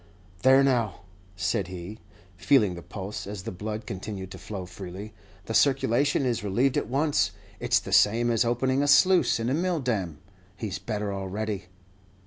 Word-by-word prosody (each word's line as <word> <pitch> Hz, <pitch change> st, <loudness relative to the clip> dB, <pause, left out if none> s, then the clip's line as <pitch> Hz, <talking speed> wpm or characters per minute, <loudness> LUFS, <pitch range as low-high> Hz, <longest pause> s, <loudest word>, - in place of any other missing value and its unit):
"There, 135 Hz, +1 st, +6 dB
now," 120 Hz, -8 st, +1 dB, 0.3 s
said 95 Hz, +2 st, -1 dB
he, 90 Hz, +4 st, -8 dB, 0.4 s
feeling 105 Hz, -1 st, +3 dB
the 85 Hz, -, -8 dB
pulse, 100 Hz, +3 st, -7 dB
as 100 Hz, -2 st, -6 dB
the -, -, -5 dB
blood 105 Hz, +4 st, -5 dB
continued 95 Hz, 0 st, -6 dB
to -, -, -9 dB
flow 100 Hz, -4 st, -6 dB
freely, 95 Hz, +3 st, -8 dB, 0.3 s
"the 115 Hz, -, -4 dB
circulation 135 Hz, +3 st, +3 dB
is 120 Hz, -4 st, -1 dB
relieved 120 Hz, +7 st, +1 dB
at -, -, 0 dB
once; 145 Hz, +3 st, +2 dB, 0.3 s
it's -, -, +2 dB
the -, -, -3 dB
same 120 Hz, +3 st, +4 dB
as 115 Hz, 0 st, +3 dB
opening 130 Hz, +3 st, +1 dB
a 145 Hz, -, +1 dB
sluice 180 Hz, +1 st, +5 dB
in 115 Hz, -, -2 dB
a 130 Hz, -, +1 dB
mill 175 Hz, +2 st, 0 dB
dam. 100 Hz, -, -2 dB, 0.4 s
He 110 Hz, -3 st, -4 dB
's -, -, -4 dB
better 105 Hz, -2 st, -3 dB
already." 100 Hz, +1 st, -4 dB
110 Hz, 170 wpm, -27 LUFS, 95-130 Hz, 0.4 s, There